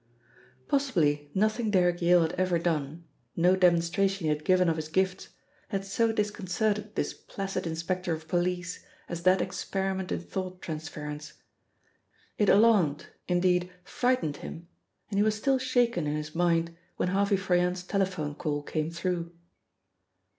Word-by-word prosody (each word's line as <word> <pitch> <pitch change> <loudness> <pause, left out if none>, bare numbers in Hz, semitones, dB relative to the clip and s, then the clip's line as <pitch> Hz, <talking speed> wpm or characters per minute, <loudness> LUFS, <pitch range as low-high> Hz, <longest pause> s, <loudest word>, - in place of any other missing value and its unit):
Possibly 160 - +1
nothing 215 +3 +1
Derrick 180 -3 +2
Yale 175 0 +5
had 160 - -1
ever 185 -1 +1
done, 160 -1 -2 0.3
no 180 +2 +4
demonstration 185 +2 +2
he 155 - +1
had 150 0 -1
given 185 0 +4
of 165 - +2
his 155 -1 -4
gifts, 185 +3 -1 0.4
had 195 -2 -3
so 225 +3 +1
disconcerted 210 0 -1
this - - -1
placid 195 -3 -5
inspector 170 +2 -2
of 160 0 -4
police 180 +1 -1 0.2
as 170 -1 -5
that 185 +2 +4
experiment 190 0 -3
in - - 0
thought 185 -1 -5
transference. 155 -1 -6 1.1
It 210 - +4
alarmed, 200 -9 +4 0.2
indeed, 180 0 +2
frightened 220 - 0
him, 170 +3 -8 0.4
and 200 - +1
he - - +5
was 215 0 +2
still 265 +5 +1
shaken 245 -10 +1
in 150 - -1
his 150 0 -5
mind 170 -1 +1 0.2
when 180 - 0
Harvey 200 +1 +2
Froyant's 180 -1 +1
telephone 185 -6 -1
call 145 -1 -3
came 155 +1 -2
through. 170 0 -3
180 Hz, 145 wpm, -28 LUFS, 165-195 Hz, 1.1 s, Yale